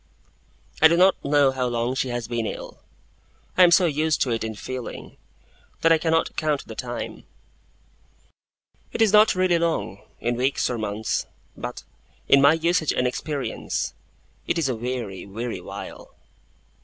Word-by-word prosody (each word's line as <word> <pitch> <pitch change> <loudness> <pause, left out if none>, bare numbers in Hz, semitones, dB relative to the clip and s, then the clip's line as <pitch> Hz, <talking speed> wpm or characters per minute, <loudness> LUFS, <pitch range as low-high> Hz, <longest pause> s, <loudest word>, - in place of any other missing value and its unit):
I 160 - +10
do 170 +1 +2
not 185 +1 +4
know 140 -1 +4
how 130 -1 -1
long 120 +1 -1
she 130 0 -1
has 120 -2 -3
been 115 -2 -2
ill. - - -7 0.7
I - - +4
am 180 - +8
so 175 +1 +5
used 155 0 +1
to 125 - -2
it 115 -1 -1
in 110 -1 -4
feeling, 130 +3 -7 0.7
that 165 - +4
I 165 - +5
cannot 165 0 +1
count 150 -3 -1
the 110 - -7
time. 120 +1 -6 1.7
It - - -5
is 220 -2 +4
not 215 -1 +6
really 185 -2 +2
long, 160 - -1 0.2
in 120 0 -1
weeks 130 +1 0
or 120 - -3
months; 105 0 -2 0.3
but, - - -6 0.4
in 140 - +6
my 140 +2 +7
usage 165 -1 +1
and 125 - 0
experience, 140 +2 -3 0.5
it - - 0
is 160 -4 +1
a 130 - -1
weary, 115 -5 -5
weary 115 +4 -5
while. - - -9
135 Hz, 160 wpm, -24 LUFS, 120-165 Hz, 1.7 s, I